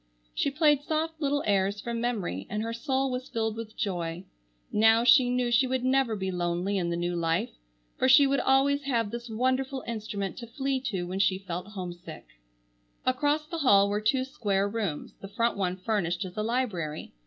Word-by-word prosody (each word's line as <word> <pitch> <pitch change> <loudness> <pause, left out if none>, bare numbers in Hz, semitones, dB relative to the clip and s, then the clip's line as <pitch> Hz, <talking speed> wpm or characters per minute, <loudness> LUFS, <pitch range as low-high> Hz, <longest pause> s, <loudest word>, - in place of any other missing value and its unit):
She - - 0
played 295 -1 +3
soft 315 +1 -2
little 285 0 +1
airs 200 0 +1
from 235 +1 -4
memory, 200 - -2
and 210 +2 -2
her 230 0 -3
soul 265 +2 -1
was 250 +1 -4
filled 220 -1 -1
with 225 -1 -8
joy. 175 -4 -3 0.5
Now 225 +2 +5
she 245 +1 +6
knew 250 -1 0
she 245 +2 +4
would 260 0 -1
never 260 -3 +2
be 190 -2 -3
lonely 180 +2 -1
in 170 -2 -1
the 170 - -1
new 175 0 -1
life, 165 -1 0 0.5
for 260 - +3
she 275 +2 +8
would 275 0 +2
always 275 +2 +3
have 230 -6 0
this 235 0 -6
wonderful 260 +3 -1
instrument 210 -4 -4
to 235 - -7
flee 270 +3 -1
to 190 -6 -2
when 185 +2 -4
she 185 -1 +3
felt 180 -1 -6
homesick. 180 -4 -8 0.8
Across 290 +4 +1
the 335 - -3
hall 200 -8 +5
were 210 +1 0
two 255 +5 +1
square 200 -6 0
rooms, 205 -8 -3
the 195 - -7
front 230 +3 0
one 185 -2 -1
furnished 190 -3 -1
as 180 - -9
a 215 - -1
library. 210 -10 -2
225 Hz, 190 wpm, -28 LUFS, 190-260 Hz, 0.8 s, she